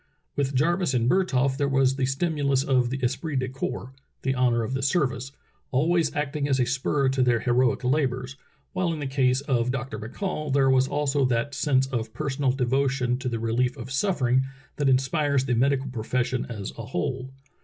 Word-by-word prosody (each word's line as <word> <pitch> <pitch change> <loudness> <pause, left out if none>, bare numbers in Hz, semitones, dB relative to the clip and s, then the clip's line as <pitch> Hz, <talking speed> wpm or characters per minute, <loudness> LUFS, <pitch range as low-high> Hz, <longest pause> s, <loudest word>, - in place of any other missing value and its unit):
With 140 -1 -1
Jarvis 170 +2 +2
and 120 -1 +2
Bertholf 135 -6 +2
there 140 -1 +1
was 135 -1 +3
the 135 -1 0
stimulus 140 -1 0
of 130 -3 +2
the 135 - -2
esprit 145 +5 -1
de 130 -1 0
corps, 130 -1 -5 0.3
the 135 - +1
honor 125 -2 +2
of 110 - -3
the 135 - -1
service, 135 -3 0 0.4
always 160 +3 +2
act 145 0 -2
ing 145 -1 0
as 135 -2 +1
a 125 - +3
spur 135 +2 0
to 130 0 0
their 120 -3 +3
heroic 125 +1 +2
labors, 130 -1 0 0.4
while 185 -2 0
in 160 - -4
the 145 - -3
case 135 -1 +1
of 125 -4 0
Dr. 125 -4 -3
McCall 150 - -4
there 135 -1 +4
was 130 0 +4
also 145 -1 0
that 125 +3 0
sense 135 -1 +2
of 115 -4 -4
personal 140 -2 0
devo 135 +1 +1
tion 125 -2 -1
to 130 -1 -2
the 115 - -2
relief 120 +3 0
of 125 +1 -8
suffering 135 -5 +2 0.4
that 145 -2 +2
inspires 135 +1 +2
the 125 - 0
medical 135 +3 +2
profession 125 +1 -1
as 105 -4 -5
a 115 - -5
whole. 130 0 -3
130 Hz, 195 wpm, -26 LUFS, 125-140 Hz, 0.4 s, there